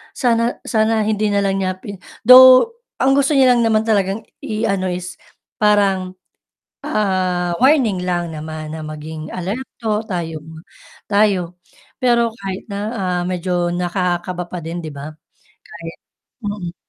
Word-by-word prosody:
sana 235 Hz, -2 st, +1 dB
sana 220 Hz, -1 st, +1 dB
hindi 215 Hz, 0 st, 0 dB
na 200 Hz, -1 st, +1 dB
lang 195 Hz, 0 st, 0 dB
niya 185 Hz, -1 st, -1 dB
pi 195 Hz, 0 st, -9 dB, 0.2 s
though 255 Hz, -, +9 dB, 0.2 s
ang 265 Hz, -, +2 dB
gusto 280 Hz, +1 st, +2 dB
niya 260 Hz, -2 st, +5 dB
lang 235 Hz, -2 st, +3 dB
naman 220 Hz, -1 st, +2 dB
talagang 205 Hz, -1 st, 0 dB, 0.2 s
i 215 Hz, +1 st, -4 dB
ano 195 Hz, -3 st, 0 dB
is 180 Hz, 0 st, -5 dB, 0.4 s
parang, 195 Hz, -3 st, +2 dB, 0.7 s
ah, 185 Hz, -3 st, 0 dB
warning 240 Hz, -10 st, +3 dB
lang 175 Hz, -2 st, -1 dB
naman 155 Hz, 0 st, -7 dB
na 160 Hz, +1 st, -6 dB
maging 155 Hz, +1 st, -7 dB
alerto 215 Hz, +2 st, -3 dB
tayo 165 Hz, -4 st, -4 dB, 0.7 s
tayo 195 Hz, -4 st, +1 dB, 0.4 s
pero 235 Hz, -2 st, +2 dB
kahit 195 Hz, -4 st, -6 dB
na, 200 Hz, -, -4 dB, 0.2 s
ah, 180 Hz, -4 st, -1 dB
medyo 180 Hz, -1 st, -1 dB
nakakakaba 180 Hz, 0 st, -2 dB
pa 180 Hz, +1 st, -6 dB
din 165 Hz, +2 st, -5 dB
'di 160 Hz, -2 st, -6 dB
ba 140 Hz, +2 st, -7 dB, 0.5 s
kahit 165 Hz, -1 st, -10 dB, 0.5 s
mm. 185 Hz, -4 st, -5 dB
190 Hz, 140 wpm, -19 LUFS, 175-220 Hz, 0.7 s, though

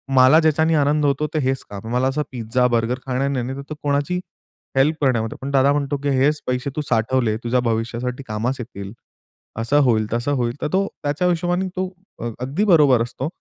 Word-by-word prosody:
मला 130 Hz, +4 st, +7 dB
ज्याच्याने 160 Hz, 0 st, +3 dB
आनंद 150 Hz, 0 st, +2 dB
होतो 145 Hz, +2 st, +1 dB
ते 155 Hz, -, +1 dB
हेच 135 Hz, -1 st, -1 dB
काम. 100 Hz, +2 st, -8 dB
मला 130 Hz, +1 st, +2 dB
असं 145 Hz, +3 st, -1 dB
पिझ्झा, 125 Hz, +1 st, 0 dB
बर्गर 120 Hz, +1 st, 0 dB
खाण्याने 135 Hz, +2 st, 0 dB
नाही 125 Hz, -2 st, -1 dB
नाहीतर 140 Hz, +3 st, -6 dB
कोणाची 145 Hz, +5 st, 0 dB, 0.6 s
हेल्प 150 Hz, +4 st, +4 dB
करण्यामध्ये. 115 Hz, -4 st, +1 dB
पण 135 Hz, +1 st, -4 dB
दादा 140 Hz, 0 st, +4 dB
म्हणतो 145 Hz, 0 st, -1 dB
की 145 Hz, -, +1 dB
"हेच 145 Hz, +3 st, +2 dB
पैसे 125 Hz, +2 st, -1 dB
तू 150 Hz, -, -1 dB
साठवले, 115 Hz, 0 st, +1 dB
तुझ्या 125 Hz, +2 st, +2 dB
भविष्यासाठी 120 Hz, +3 st, -2 dB
कामास 115 Hz, +5 st, -2 dB
येतील," 100 Hz, -4 st, -7 dB, 0.7 s
असं 140 Hz, +6 st, +2 dB
होईल, 110 Hz, -4 st, +2 dB
तसं 120 Hz, +5 st, 0 dB
होईल. 120 Hz, -3 st, -1 dB
तर -, -, 0 dB
तो 195 Hz, +1 st, +3 dB, 0.2 s
त्याच्या 145 Hz, +5 st, 0 dB
हिशोबाने 175 Hz, +2 st, 0 dB
तो 185 Hz, 0 st, 0 dB, 0.3 s
अ, 120 Hz, -, -3 dB
अगदी 135 Hz, +10 st, -1 dB
बरोबर 150 Hz, -, +5 dB
असतो. 125 Hz, +3 st, -4 dB
130 Hz, 190 wpm, -21 LUFS, 120-145 Hz, 0.7 s, मला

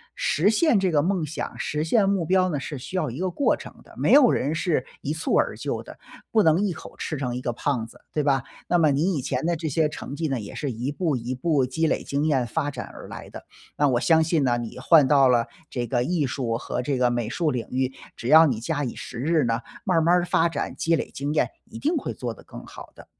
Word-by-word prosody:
实 175 Hz, +7 st, +2 dB
现 230 Hz, +1 st, +3 dB
这 190 Hz, -1 st, +1 dB
个 150 Hz, -4 st, +2 dB
梦 185 Hz, 0 st, 0 dB
想， 155 Hz, +1 st, -5 dB
实 150 Hz, +1 st, -2 dB
现 195 Hz, +4 st, +3 dB
目 195 Hz, -4 st, +1 dB
标 185 Hz, +2 st, +3 dB
呢， 150 Hz, -5 st, -2 dB
是 140 Hz, 0 st, -6 dB
需 180 Hz, +9 st, -5 dB
要 155 Hz, -8 st, -1 dB
一 130 Hz, -, -7 dB
个 185 Hz, +1 st, 0 dB
过 225 Hz, +11 st, +1 dB
程 -, -, -10 dB
的。 -, -, -18 dB
没 -, -, +3 dB
有 275 Hz, -4 st, +7 dB
人 145 Hz, +5 st, 0 dB
是 160 Hz, -5 st, 0 dB, 0.2 s
一 145 Hz, -, -2 dB
蹴 160 Hz, -, -1 dB
而 -, -, +1 dB
就 -, -, -3 dB
的， -, -, -13 dB, 0.3 s
不 220 Hz, -, +4 dB
能 165 Hz, -1 st, +4 dB
一 205 Hz, -2 st, +1 dB
口 -, -, -10 dB
吃 155 Hz, -, -4 dB
成 125 Hz, -3 st, -3 dB
一 125 Hz, -, -4 dB
个 120 Hz, -, -1 dB
胖 120 Hz, -1 st, -1 dB
子， 115 Hz, -, -15 dB
对 150 Hz, -, 0 dB
吧？ 135 Hz, -2 st, +2 dB, 0.2 s
那 175 Hz, -, +3 dB
么 155 Hz, -3 st, +4 dB
你 160 Hz, +8 st, +1 dB
以 -, -, -2 dB
前 130 Hz, +2 st, -2 dB
的 170 Hz, 0 st, +1 dB
这 160 Hz, 0 st, -4 dB
些 155 Hz, +1 st, +1 dB
成 140 Hz, -, -7 dB
绩 160 Hz, 0 st, -2 dB
呢， 135 Hz, -3 st, -1 dB
也 105 Hz, -, -8 dB
是 145 Hz, -3 st, -3 dB
一 120 Hz, +3 st, -3 dB
步 150 Hz, -1 st, -1 dB
一 120 Hz, +2 st, -4 dB
步 140 Hz, 0 st, +1 dB
积 145 Hz, +6 st, -1 dB
累 -, -, +1 dB
经 140 Hz, +2 st, -1 dB
验 130 Hz, -5 st, +1 dB
发 145 Hz, +4 st, -2 dB
展 130 Hz, -3 st, -6 dB
而 -, -, -10 dB
来 -, -, -9 dB
的。 -, -, -10 dB, 0.3 s
那 145 Hz, -1 st, +3 dB
我 120 Hz, -2 st, +2 dB
相 160 Hz, +4 st, +4 dB
信 160 Hz, -1 st, +1 dB
呢， 120 Hz, -2 st, +2 dB
你 120 Hz, -2 st, -6 dB
换 160 Hz, -4 st, +6 dB
到 135 Hz, 0 st, +5 dB
了 120 Hz, -2 st, +3 dB, 0.2 s
这 120 Hz, -1 st, -3 dB
个 120 Hz, 0 st, 0 dB
艺 170 Hz, -2 st, 0 dB
术 125 Hz, -3 st, -2 dB
和 125 Hz, -, -3 dB
这 135 Hz, +1 st, -1 dB
个 125 Hz, -1 st, +3 dB
美 120 Hz, -2 st, -1 dB
术 155 Hz, +6 st, 0 dB
领 125 Hz, -2 st, -3 dB
域， 130 Hz, 0 st, 0 dB, 0.2 s
只 120 Hz, -, -5 dB
要 160 Hz, +2 st, +9 dB
你 120 Hz, -7 st, -1 dB
假以时日 145 Hz, +2 st, -1 dB
呢， 115 Hz, -1 st, 0 dB, 0.2 s
慢 180 Hz, -3 st, +1 dB
儿 -, -, +4 dB
慢 170 Hz, +2 st, +4 dB
儿 175 Hz, 0 st, +2 dB
发 170 Hz, -1 st, +2 dB
展 165 Hz, -3 st, -3 dB
积 165 Hz, 0 st, +2 dB
累 -, -, -4 dB
经 140 Hz, +2 st, -3 dB
验， 155 Hz, -, +2 dB, 0.2 s
一 225 Hz, -, -11 dB
定 310 Hz, +8 st, 0 dB
会 -, -, -3 dB
做 -, -, -4 dB
得 -, -, -16 dB
更 -, -, -10 dB
好 -, -, -11 dB
的。 -, -, -14 dB
150 Hz, 290 characters per minute, -24 LUFS, 130-170 Hz, 0.3 s, 要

